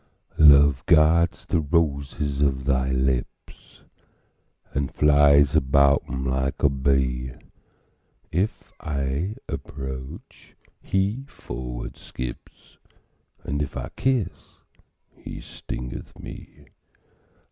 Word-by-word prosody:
Love 70 -3 +7
guards 85 +1 +4
the 85 - +1
roses 70 -3 -1
of 65 -2 +1
thy 65 -1 +1
lips, 65 -1 -3 0.9
And 70 -1 -1
flies 70 0 +5
about 70 -1 +4
them 65 +1 -4
like 65 +1 -1
a 70 - +6
bee: 65 -2 0 1.0
If 95 +7 -2
I 70 +6 -2
approach, 65 -1 -8 0.3
he 100 +7 -1
forward - - -7
skips, 60 -1 -9 0.6
And 70 +1 -2
if 75 - -4
I - - -5
kiss, 125 -9 -1 0.6
he - - -9
stingeth 60 0 -8
me. - - -11
70 Hz, 90 wpm, -24 LUFS, 65-75 Hz, 1.0 s, Love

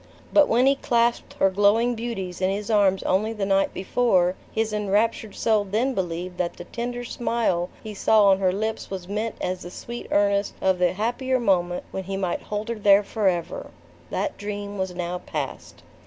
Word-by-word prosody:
But 295 -1 +6
when 240 +3 +3
he 275 0 +4
clasped 235 -2 +1
her 195 - +2
glowing 205 +5 +3
beauties 220 -6 -5
in 185 - +2
his 205 +3 -2
arms 195 -3 +3
only 215 +4 +1
the 210 -3 -2
night 195 0 +2
before, 185 -3 +2 0.2
his 220 -1 -1
enraptured 210 +1 0
soul 220 -2 +2
then 220 +7 0
believed 180 -2 -4
that 175 -1 -1
the 175 - -8
tender 240 +4 -4
smile 230 -7 -1
he 215 - -6
saw 210 +1 +4
on 190 0 +4
her 185 -2 +2
lips 220 +3 -3
was 185 -2 -6
meant 215 +3 -2
as 185 0 -2
the 175 - -7
sweet 235 +6 -7
earnest 200 0 +2
of 190 -1 +1
the 180 -1 +3
happier 245 +6 0
moment, 180 -5 +1
when 190 -1 -4
he 195 +1 -3
might 185 -3 -1
hold 210 +2 -4
her 230 -2 -3
there 200 0 +6
forever! 190 -5 -1 0.4
That 300 - -2
dream 205 -1 -5
was 190 -1 -2
now 175 0 -3
past. 145 -6 -6
205 Hz, 185 wpm, -24 LUFS, 185-225 Hz, 0.4 s, But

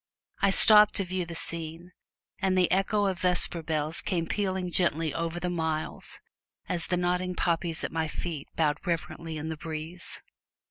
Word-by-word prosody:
I 200 - +4
stopped 210 +2 +8
to 195 - +1
view 180 -1 -3
the 170 - -7
scene, 165 +1 -5 0.5
and 190 -1 0
the 180 -1 +2
echo 200 +2 +1
of 190 -2 -2
vesper 180 -2 +3
bells 155 0 +1
came 170 -4 -2
pealing 190 -1 -2
gently 165 -4 0
over 165 +1 -3
the 180 - -3
miles, 160 -3 -4 0.5
as 170 -2 -3
the 180 - 0
nodding 180 +1 -1
poppies 170 -2 -1
at - - -3
my 160 -1 -2
feet 155 -2 -6
bowed 150 -1 0
reverently 165 -1 -4
in 155 +1 -5
the 160 - -5
breeze. 160 +3 -7
170 Hz, 170 wpm, -27 LUFS, 160-185 Hz, 0.5 s, stopped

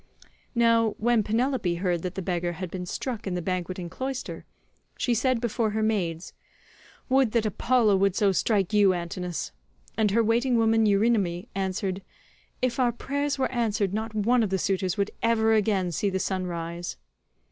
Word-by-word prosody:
Now 230 -2 +3
when 235 0 +2
Penelope 225 -3 0
heard 175 -1 -1
that 180 +1 -5
the 190 - -4
beggar 175 -1 -1
had 180 0 -6
been 180 -1 -5
struck 230 +1 -4
in 185 - -2
the - - -1
banqueting 185 0 -3
cloister, 260 +8 -5 0.5
she 245 - +1
said 255 +1 +1
before 230 -1 0
her 215 +1 -1
maids, 185 -6 -1 0.7
"Would 260 -4 +3
that 230 -2 +2
Apollo 215 0 +2
would 195 -1 +2
so 200 -1 +3
strike 200 0 +1
you, 200 -2 +5
Antinous," 175 -2 -4 0.4
and 215 -1 +2
her 230 +3 +3
waiting 235 +3 +2
woman 225 -1 +3
Eurynome 200 -4 +1
answered, 190 0 -2 0.6
"If 255 0 0
our 245 -2 +3
prayers 285 +4 -2
were 265 - 0
answered 220 -5 0
not 220 +1 -3
one 235 +4 +3
of 215 - +1
the 190 - 0
suitors 185 0 -1
would 200 0 0
ever 225 -1 +3
again 200 -4 +1
see 200 +5 0
the 190 - -1
sun 185 -1 -2
rise." 170 0 -5
210 Hz, 170 wpm, -26 LUFS, 185-230 Hz, 0.7 s, you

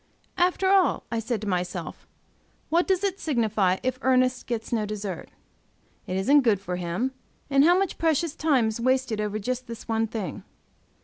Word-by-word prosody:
"After 360 +2 +2
all," 385 -2 +3
I 230 - 0
said 225 -1 -2
to 215 - -5
myself, 180 -3 -3 0.6
"what 340 +2 +2
does 380 0 +1
it 390 -1 -1
signify, 215 - +1
if 255 0 -1
Ernest 255 -1 +2
gets 235 -1 -3
no 220 -2 +1
dessert? 205 -4 -5 0.8
It 185 - -2
isn't 280 +10 +5
good 225 -6 +2
for 180 -2 -4
him, 180 +9 -2 0.4
and 275 0 +5
how 350 +3 +5
much 390 -1 -1
precious 325 -1 +1
time 270 -8 +2
is 220 - -5
wasted 255 -3 +1
over 210 0 -2
just 250 +4 -3
this 230 -1 -8
one 225 0 0
thing?" 215 -3 -5
235 Hz, 175 wpm, -26 LUFS, 210-280 Hz, 0.8 s, isn't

